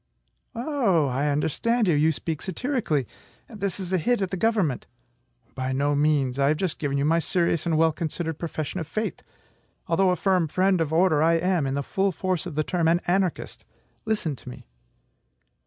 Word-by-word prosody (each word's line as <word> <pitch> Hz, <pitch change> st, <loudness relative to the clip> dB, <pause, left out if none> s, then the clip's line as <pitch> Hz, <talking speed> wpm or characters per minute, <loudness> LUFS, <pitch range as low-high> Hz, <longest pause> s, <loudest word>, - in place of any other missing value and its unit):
"Oh! 230 Hz, -, +1 dB
I 135 Hz, +4 st, 0 dB
understand 195 Hz, -, +1 dB
you; 175 Hz, -, +4 dB
you 155 Hz, +2 st, +3 dB
speak 155 Hz, +3 st, -4 dB
satirically. 190 Hz, -, -1 dB, 0.4 s
This 200 Hz, -4 st, -4 dB
is 190 Hz, -1 st, -4 dB
a 185 Hz, -, +3 dB
hit 240 Hz, +8 st, +1 dB
at 185 Hz, -, -3 dB
the -, -, -1 dB
government." 190 Hz, -, 0 dB, 0.7 s
"By 130 Hz, 0 st, -3 dB
no 145 Hz, +2 st, +1 dB
means. 145 Hz, -3 st, +1 dB
I 140 Hz, -, +3 dB
have 150 Hz, +2 st, +2 dB
just 185 Hz, -3 st, -2 dB
given 140 Hz, -2 st, -1 dB
you 140 Hz, -, +1 dB
my 165 Hz, +2 st, +3 dB
serious 170 Hz, 0 st, 0 dB
and 160 Hz, -2 st, +2 dB
well 160 Hz, 0 st, +4 dB
considered 160 Hz, 0 st, -4 dB
profession 160 Hz, +1 st, -4 dB
of 160 Hz, -, -5 dB
faith. 215 Hz, +7 st, -3 dB, 0.6 s
Although 185 Hz, +2 st, +2 dB
a 180 Hz, -, +2 dB
firm 185 Hz, -3 st, +1 dB
friend 185 Hz, +3 st, +2 dB
of 160 Hz, -2 st, -1 dB
order, 160 Hz, -2 st, +3 dB
I 165 Hz, +1 st, +4 dB
am 170 Hz, -3 st, +1 dB
(in 135 Hz, -, -1 dB
the 140 Hz, -, -1 dB
full 195 Hz, +7 st, 0 dB
force 185 Hz, 0 st, -2 dB
of 165 Hz, -, -7 dB
the 155 Hz, -, +1 dB
term) 170 Hz, 0 st, 0 dB
an 170 Hz, +1 st, +4 dB
anarchist. 185 Hz, -1 st, -1 dB, 0.4 s
Listen 210 Hz, -9 st, -1 dB
to -, -, -10 dB
me." -, -, -11 dB
165 Hz, 190 wpm, -25 LUFS, 150-190 Hz, 0.7 s, you